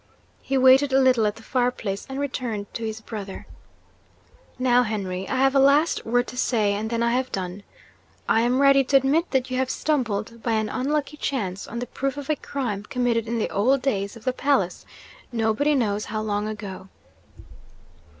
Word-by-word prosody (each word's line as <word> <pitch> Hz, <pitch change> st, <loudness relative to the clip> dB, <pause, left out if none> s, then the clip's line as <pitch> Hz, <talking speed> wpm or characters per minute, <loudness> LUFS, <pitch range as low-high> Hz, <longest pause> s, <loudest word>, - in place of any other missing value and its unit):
He 270 Hz, -, -1 dB
waited 260 Hz, +2 st, +6 dB
a 270 Hz, -, +5 dB
little 255 Hz, -5 st, +4 dB
at 210 Hz, -, -2 dB
the 225 Hz, -, -14 dB
fire 245 Hz, +1 st, +1 dB
place, 200 Hz, -5 st, -5 dB
and 270 Hz, +1 st, -4 dB
returned 245 Hz, -7 st, -4 dB
to 230 Hz, -, -5 dB
his 220 Hz, 0 st, -4 dB
brother. 205 Hz, -3 st, -7 dB, 1.1 s
'Now, 250 Hz, -1 st, +4 dB
Henry, 195 Hz, -5 st, -3 dB
I -, -, -1 dB
have 270 Hz, +1 st, +3 dB
a 275 Hz, -, +4 dB
last 280 Hz, +3 st, +3 dB
word 245 Hz, +2 st, +2 dB
to 250 Hz, -, -9 dB
say, 215 Hz, -5 st, +1 dB
and 215 Hz, +2 st, -3 dB
then 230 Hz, 0 st, 0 dB
I 235 Hz, -, +2 dB
have 255 Hz, +1 st, -1 dB
done. 185 Hz, +1 st, -4 dB, 0.7 s
I 225 Hz, -, +3 dB
am 245 Hz, +2 st, +2 dB
ready 275 Hz, -1 st, +6 dB
to 275 Hz, +2 st, +5 dB
admit 285 Hz, +6 st, +1 dB
that 260 Hz, -1 st, 0 dB
you 255 Hz, -, -1 dB
have 260 Hz, 0 st, 0 dB
stumbled, 230 Hz, -7 st, -1 dB
by 230 Hz, 0 st, -1 dB
an 215 Hz, -1 st, 0 dB
unlucky 290 Hz, +4 st, -2 dB
chance, 200 Hz, -11 st, -3 dB
on 235 Hz, -, -7 dB
the 245 Hz, -, -3 dB
proof 270 Hz, +2 st, -3 dB
of 285 Hz, +1 st, -3 dB
a -, -, +2 dB
crime 245 Hz, -8 st, -4 dB
committed 235 Hz, 0 st, -1 dB
in 235 Hz, +1 st, -1 dB
the 220 Hz, -, -1 dB
old 255 Hz, +7 st, +2 dB
days 200 Hz, -6 st, -1 dB
of 230 Hz, -, -13 dB
the 255 Hz, -, +1 dB
palace, 260 Hz, -10 st, 0 dB, 0.4 s
nobody 235 Hz, +6 st, +1 dB
knows 210 Hz, -5 st, 0 dB
how 215 Hz, 0 st, -3 dB
long 210 Hz, 0 st, -1 dB
ago. 200 Hz, -3 st, -7 dB
240 Hz, 195 wpm, -24 LUFS, 215-270 Hz, 1.1 s, waited